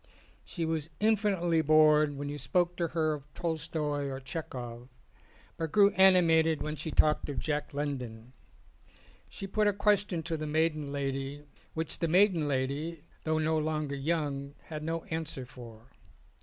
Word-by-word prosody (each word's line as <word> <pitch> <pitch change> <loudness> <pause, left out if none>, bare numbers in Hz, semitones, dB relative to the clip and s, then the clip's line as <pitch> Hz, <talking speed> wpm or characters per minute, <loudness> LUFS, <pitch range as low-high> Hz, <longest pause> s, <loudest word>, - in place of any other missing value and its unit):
She 170 -3 -4
was 160 -1 -2
infinitely 200 -6 +2
bored 155 -1 +5
when 145 +1 -4
you 145 +1 -4
spoke 175 +5 +1
to 170 - 0
her 155 -1 0
of 150 0 -9
Tolstoi 155 -3 -2
or 135 0 -4
Chekov; 125 -4 -6 0.7
but 160 -2 -3
grew 205 +2 +6
animated 165 -4 +5
when 150 0 -3
she 155 +2 -5
talked 150 0 +2
of 145 - -4
Jack 150 0 -2
London. 130 -5 -4 1.0
She - - -7
put 210 +2 +1
a 205 - +3
question 200 -4 +1
to 165 0 -2
the 155 0 -4
maiden 155 -1 0
lady 140 0 -3 0.3
which 160 -1 -1
the 165 - +1
maiden 180 -2 +4
lady, 145 +4 -2 0.2
though 160 0 +1
no 155 0 +1
longer 155 -2 -2
young, 140 -1 -2
had 155 -2 -5
no 165 +1 -3
answer 160 -5 -4
for. 120 -1 -13
155 Hz, 155 wpm, -30 LUFS, 140-165 Hz, 1.0 s, grew